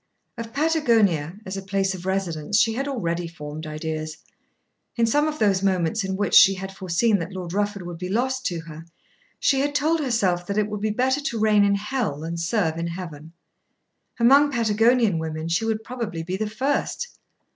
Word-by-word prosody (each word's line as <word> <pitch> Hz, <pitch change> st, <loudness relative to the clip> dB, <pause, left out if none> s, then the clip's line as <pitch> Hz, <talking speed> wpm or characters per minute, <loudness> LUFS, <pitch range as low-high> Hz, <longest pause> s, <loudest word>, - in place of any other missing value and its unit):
Of 230 Hz, -2 st, -7 dB
Patagonia, 230 Hz, -, +2 dB
as 190 Hz, +1 st, -5 dB
a -, -, -4 dB
place 195 Hz, 0 st, -1 dB
of 185 Hz, 0 st, -7 dB
residence, 190 Hz, -1 st, -1 dB
she 225 Hz, 0 st, +3 dB
had 270 Hz, +4 st, -2 dB
already 175 Hz, -10 st, -2 dB
formed 155 Hz, -1 st, -8 dB
ideas. 155 Hz, 0 st, -4 dB, 0.8 s
In 235 Hz, -, +3 dB
some 295 Hz, +7 st, +2 dB
of 305 Hz, 0 st, -3 dB
those 200 Hz, -5 st, +2 dB
moments 190 Hz, +1 st, +1 dB
in 190 Hz, 0 st, -2 dB
which 205 Hz, +1 st, -1 dB
she 195 Hz, 0 st, +8 dB
had 190 Hz, +1 st, -7 dB
foreseen 190 Hz, +4 st, +1 dB
that 170 Hz, +3 st, -5 dB
Lord 180 Hz, -2 st, -6 dB
Rufford 205 Hz, -1 st, -1 dB
would 175 Hz, -1 st, -7 dB
be 180 Hz, 0 st, -4 dB
lost 260 Hz, +5 st, 0 dB
to 170 Hz, -2 st, -3 dB
her, 160 Hz, 0 st, -10 dB, 0.5 s
she 270 Hz, -, +2 dB
had 285 Hz, +1 st, 0 dB
told 315 Hz, +3 st, +2 dB
herself 195 Hz, -, 0 dB
that 200 Hz, -, -2 dB
it 210 Hz, 0 st, +1 dB
would 210 Hz, -1 st, -4 dB
be 215 Hz, -, 0 dB
better 260 Hz, +6 st, +1 dB
to 240 Hz, -6 st, -3 dB
reign 210 Hz, -1 st, +4 dB
in 200 Hz, 0 st, +3 dB
Hell 210 Hz, -, -2 dB
than 165 Hz, +1 st, -4 dB
serve 170 Hz, -2 st, 0 dB
in 170 Hz, -, -2 dB
Heaven. 165 Hz, -3 st, -8 dB, 0.9 s
Among 280 Hz, +5 st, +6 dB
Patagonian 225 Hz, -4 st, +3 dB
women 160 Hz, 0 st, -4 dB
she 170 Hz, +7 st, +1 dB
would 220 Hz, -1 st, -1 dB
probably 225 Hz, -10 st, -5 dB
be 180 Hz, +3 st, -3 dB
the 215 Hz, +2 st, -2 dB
first. 275 Hz, -, -2 dB
200 Hz, 190 wpm, -24 LUFS, 170-235 Hz, 0.9 s, she